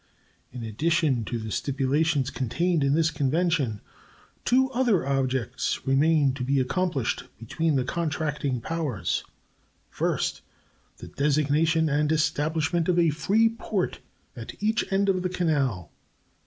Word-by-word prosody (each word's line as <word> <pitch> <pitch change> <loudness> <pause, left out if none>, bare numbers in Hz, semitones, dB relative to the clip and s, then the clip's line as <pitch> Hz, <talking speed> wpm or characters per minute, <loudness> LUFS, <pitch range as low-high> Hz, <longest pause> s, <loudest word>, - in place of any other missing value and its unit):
In 125 -1 -7
addition 135 - 0
to 120 - -3
the 110 -1 -6
stipulations 140 +3 0
contained 165 +6 0
in 140 +1 +2
this 165 0 +2
convention, 145 - 0 0.6
two 265 +1 +3
other 240 - +2
objects 130 -4 -1
remain 140 +1 +3
to 130 -1 -4
be 135 +2 +1
accomplished 145 -1 -1
between 150 +7 -1
the 130 - +2
contracting 150 -4 -2
powers: 155 - -2 0.7
First. - - -1 0.6
The - - -10
designation 150 +3 +2
and 150 +1 +1
establishment 160 +2 0
of 180 - +2
a 170 -2 +4
free 195 +9 +2
port 220 -4 -2 0.4
at 115 -2 -8
each 215 0 0
end 195 +1 +2
of 185 -2 +2
the 185 - -1
canal. 140 - -1
150 Hz, 130 wpm, -26 LUFS, 135-170 Hz, 0.7 s, a